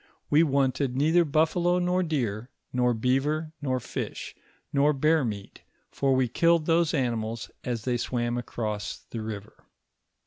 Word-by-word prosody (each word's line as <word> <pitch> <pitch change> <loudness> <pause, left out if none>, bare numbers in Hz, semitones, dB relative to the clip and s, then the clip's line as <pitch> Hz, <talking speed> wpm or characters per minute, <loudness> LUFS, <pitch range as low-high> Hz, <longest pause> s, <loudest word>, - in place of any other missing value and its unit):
"We 150 - +6
wanted 135 -3 +1
neither 160 +6 +4
buffalo 170 +3 +2
nor 180 +1 +1
deer, 125 - -2 0.2
nor 125 -1 +2
beaver, 145 +7 0
nor 130 -3 0
fish, - - -5 0.4
nor 145 +1 +4
bear 155 +2 +3
moat, 105 -4 -5 0.3
fur 140 - 0
we 130 -1 +2
killed 165 +6 +3
those 165 -1 +2
animals 115 -4 -2
as 120 -3 -3
they 125 -1 0
swam 120 0 -1
across 110 -3 -3
the 115 - -8
river. 110 -1 -7
130 Hz, 140 wpm, -27 LUFS, 120-155 Hz, 0.4 s, We